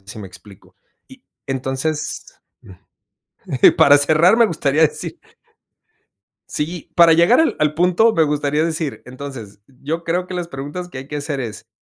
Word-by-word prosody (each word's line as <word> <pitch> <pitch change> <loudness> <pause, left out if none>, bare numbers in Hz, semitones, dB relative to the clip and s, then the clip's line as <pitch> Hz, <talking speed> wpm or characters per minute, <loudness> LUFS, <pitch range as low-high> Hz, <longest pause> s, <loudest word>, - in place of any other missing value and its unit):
sé 100 +1 -11
si - - -11
me 95 - -9
explico. 90 +2 -17 0.3
Y - - -17 0.2
entonces 135 +3 -4 0.2
mm, 95 - -14 1.0
para 145 0 +6
cerrar 155 +8 +4
me 235 -1 +5
gustaría 155 -3 0
decir 155 - -1 1.3
sí, 160 +2 -5
para 170 -1 +7
llegar 170 +9 +4
al 320 - +1
al 150 0 +1
punto 180 +7 +3
me 160 -5 +3
gustaría 150 +1 0
decir, 160 -3 -3
entonces, 125 -6 -9
yo 145 +5 -5
creo 175 +2 -2
que 185 - -7
las 175 -1 -4
preguntas 145 +6 -7
que 135 - -9
hay 135 - -9
que 150 - -8
hacer 145 -1 -4
es, 115 -3 -7
150 Hz, 165 wpm, -19 LUFS, 135-170 Hz, 1.3 s, para